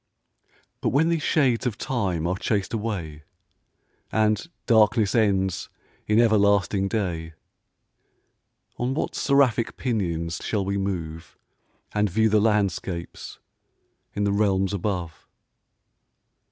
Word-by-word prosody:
But - - +1
when 155 +5 +2
these 165 -2 0
shades 130 -6 +2
of 115 -2 -3
time 95 -10 -2
are 90 +2 0
chas'd 100 +1 -1
away, 95 -9 -4 0.9
And 110 +3 +1 0.2
darkness 110 -2 +4
ends 95 -5 +1 0.4
in 105 +1 +3
everlasting 100 -4 +3
day, 85 -6 -3 1.5
On 125 +2 -1
what - - -2
seraphic 135 -5 +2
pinions 85 -9 -2
shall 100 -3 -1
we 100 +1 -1
move, 85 -4 -5 0.5
And 105 0 +1
view 110 +4 +2
the 105 0 +3
landscapes 100 -5 -1 0.8
in 105 - 0
the 100 - +1
realms 100 -1 +1
above? 90 -4 -4
100 Hz, 110 wpm, -24 LUFS, 95-115 Hz, 1.5 s, darkness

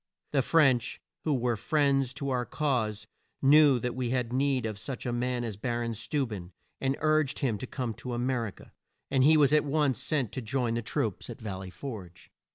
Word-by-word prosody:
The 140 - +3
French, 135 -4 +3 0.3
who 150 -3 +2
were 120 -2 +1
friends 135 +1 +1
to 140 -2 -3
our 125 -1 +1
cause, 120 -7 -1 0.3
knew 145 -1 +6
that 125 +1 -2
we 125 -1 -2
had 125 -1 -1
need 135 -2 +1
of 110 -2 -4
such 130 +3 -6
a 120 - -1
man 125 0 -1
as 110 -4 -4
Bar 120 +2 -2
on 115 - -2
Steu 115 +6 -1
ben, 95 -5 -7 0.3
and 135 0 0
urged 155 -2 +2
him 115 -7 0
to 130 - -5
come 125 -4 -3
to 125 +2 -5
A - - -3
mer 120 -1 0
i - - -4
ca, - - -15 0.4
and 135 -1 +4
he 155 +3 +6
was 145 -1 +5
at 150 - +5
once 145 -3 +1
sent 140 -6 0
to 130 - -4
join 120 0 -1
the 115 - -1
troops - - -2
at - - -7
Val 100 -4 -5
ley 95 -1 -7
Forge. 95 -6 -9
125 Hz, 220 wpm, -29 LUFS, 115-140 Hz, 0.4 s, knew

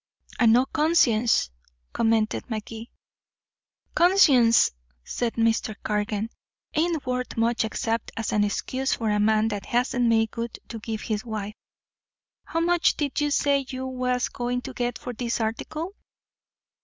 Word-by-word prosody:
"And 235 -2 +6
no 250 +2 +4
conscience," 245 - +2 0.4
commented 225 +1 +1
Magee. 225 +1 -6 1.0
"Conscience," 285 -11 +5 0.3
said 235 - -2
Mr. 225 -1 +1
Cargan, 210 +1 -2 0.4
"ain't 320 -2 0
worth 250 -1 -3
much 230 +1 +2
except 225 0 -2
as 225 - -2
an 210 -1 +2
excuse 260 +6 -1
for 220 -2 -1
a 210 - +1
man 215 +1 +3
that 205 -2 -5
hasn't 245 0 +1
made 225 -1 +2
good 235 0 -5
to 230 - -6
give 220 0 -5
his 215 -1 -3
wife. 215 -3 -5 0.9
How 330 - -2
much 345 0 +2
did 295 0 -1
you 295 - +1
say 280 -1 +2
you 260 0 -4
was 250 -1 -1
going 245 +1 -3
to 265 - -7
get 245 0 -2
for 250 - -6
this 235 +1 -2
article?" 305 - -3
235 Hz, 145 wpm, -25 LUFS, 220-260 Hz, 1.0 s, And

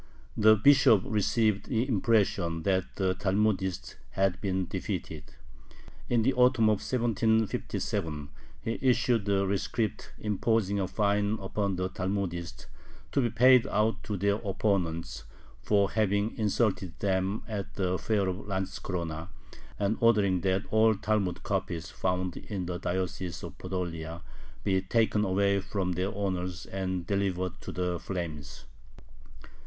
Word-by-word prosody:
The 110 0 +6
Bishop 115 -3 +5
received 110 -1 +1
the 120 +1 0
impression 100 -7 +1
that 95 -1 0
the 95 -1 +1
Talmudists 95 -2 -1
had 95 -1 0
been 95 -2 -1
defeated. 80 -2 -4 0.8
In 120 -2 +3
the 135 +4 +3
autumn 125 -3 +4
of 105 - +2
1757 110 - -1 0.3
he 115 0 -2
issued 120 -4 +2
a 100 0 +2
rescript 100 +2 -2
imposing 105 -1 0
a 95 - 0
fine 105 +1 +1
upon 100 0 -2
the 90 0 -1
Talmudists, 95 -2 -3 0.5
to 140 - +2
be 120 - +1
paid 125 +2 +5
out 110 +1 +1
to 105 - -3
their 100 +2 +1
opponents, 95 -5 -1 0.4
for 100 -2 +2
having 105 0 +1
insulted 100 -4 0
them 95 +1 0
at 105 -4 -5
the 90 -2 0
fair 105 -3 +1
of 95 +2 -4
Lantzkorona, 90 -4 -3 0.5
and 105 +2 0
ordering 105 -6 +3
that 95 +2 +1
all 110 0 +4
Talmud 100 -2 -1
copies 85 -2 -2
found 90 -1 -1
in 95 -4 -5
the 90 0 -4
diocese 90 0 -3
of - - -7
Podolia 85 -3 -4 0.4
be 95 -1 +2
taken 105 +2 +1
away 100 0 +2
from 95 -1 -2
their 90 +2 -1
owners 90 -3 -3
and 95 -2 -3
delivered 95 -2 -1
to - - -6
the 90 -1 -2
flames. 80 -9 -6
100 Hz, 130 wpm, -29 LUFS, 90-110 Hz, 0.8 s, The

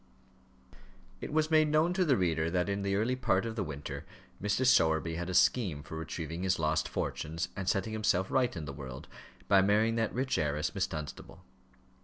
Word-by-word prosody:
It - - -5
was 155 +1 +1
made 155 -1 +5
known 155 +3 +2
to 185 0 +2
the 145 -7 +3
reader 85 -3 +1
that 90 +2 0
in 100 0 -1
the 100 0 0
early 115 +5 +1
part 115 -6 +1
of 115 -1 -4
the 105 - -1
winter 75 -4 -6 0.4
Mr. 105 +5 +1
Sowerby 80 -8 +3
had 85 +2 -4
a 90 - -2
scheme 90 - +2
for 80 - -8
retrieving 80 +1 -5
his 95 0 +1
lost 80 0 0
fortunes, 80 +3 -3
and 95 -2 -2
setting 110 +3 0
himself 95 -3 +1
right 125 -2 +2
in 80 - -5
the 70 - -6
world, 65 -1 -8 0.4
by 95 -1 +6
marrying 110 +3 +2
that 110 -1 0
rich 130 +1 -1
heiress, 75 +2 -1
Miss 95 -2 0
Dunstable. 75 -5 -8
95 Hz, 195 wpm, -31 LUFS, 80-115 Hz, 0.4 s, by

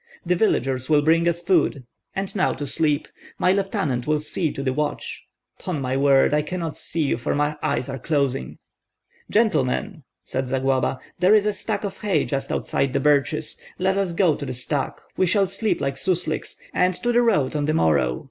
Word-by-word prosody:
The 180 - +2
villagers 135 - +1
will 150 -1 +4
bring 165 +2 +3
us 170 0 0
food, 165 -7 +2 0.3
and 195 +1 -3
now 190 - +2
to 145 - -5
sleep! 150 +1 0 0.3
My 180 - +3
lieutenant 155 -10 -1
will 155 0 +3
see 155 +1 -1
to 135 - -5
the 130 -1 0
watch. 150 +2 -3 0.3
'Pon 180 -5 -3
my 130 -1 -2
word, 135 0 +4
I 150 - +3
cannot 165 0 -4
see 165 - -2
you, 140 - 0
for - - -1
my 145 +1 0
eyes 125 - -1
are 135 -1 -5
closing." 140 - -1 0.7
"Gentlemen," 205 - +1 0.2
said 130 0 -3
Zagloba, 135 0 0 0.2
"there 185 +4 +5
is 210 -1 +3
a 210 - +1
stack 205 +1 -3
of 200 -2 -5
hay 195 -8 +1
just 135 -1 -3
outside 135 -2 -1
the - - +2
birches; 145 0 +1 0.2
let 190 +1 +1
us 195 -2 0
go 170 -3 +3
to - - -7
the 130 - -3
stack, 130 +3 -3 0.2
we 185 - +3
shall 195 +2 +3
sleep 195 +3 -1
like 135 -1 -2
susliks, 170 -2 -1 0.2
and 180 0 +2
to 240 - -1
the 240 0 +4
road 195 - +2
on 145 -1 0
the 155 - +1
morrow. 70 - +2
155 Hz, 195 wpm, -23 LUFS, 135-185 Hz, 0.7 s, there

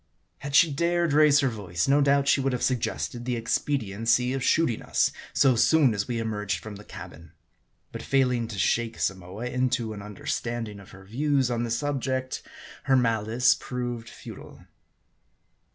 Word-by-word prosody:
Had 140 0 -4
she 165 0 +6
dared 170 +1 +1
raise 150 -1 +5
her 135 - +2
voice, 95 -8 -2
no 140 +2 +4
doubt 140 0 +3
she 140 - +4
would 135 -1 0
have 125 - -2
suggested 120 -1 -2
the 125 0 -2
expediency 115 0 0
of 135 -1 -2
shooting 140 -8 +2
us - - +1 0.2
so 135 -3 +3
soon 140 +1 +4
as 100 -1 -2
we 120 -2 -2
emerged 105 -3 -2
from 105 -2 -9
the 105 - -12
cabin. 85 -5 -11 0.6
But - - -7
failing 125 -4 +1
to 110 -3 -7
shake 115 +3 0
Samoa 95 +4 -3
into 125 -3 -1
an 105 - -8
understanding 105 +1 -4
of 100 - -14
her 95 0 -14
views 135 +3 0
on 120 -1 -1
the - - -5
sub 140 +3 -1
ject, 130 0 -2 0.4
her 135 - +4
malice 115 0 +2
proved 120 -2 -5
futile. - - -11
120 Hz, 170 wpm, -26 LUFS, 110-135 Hz, 0.6 s, she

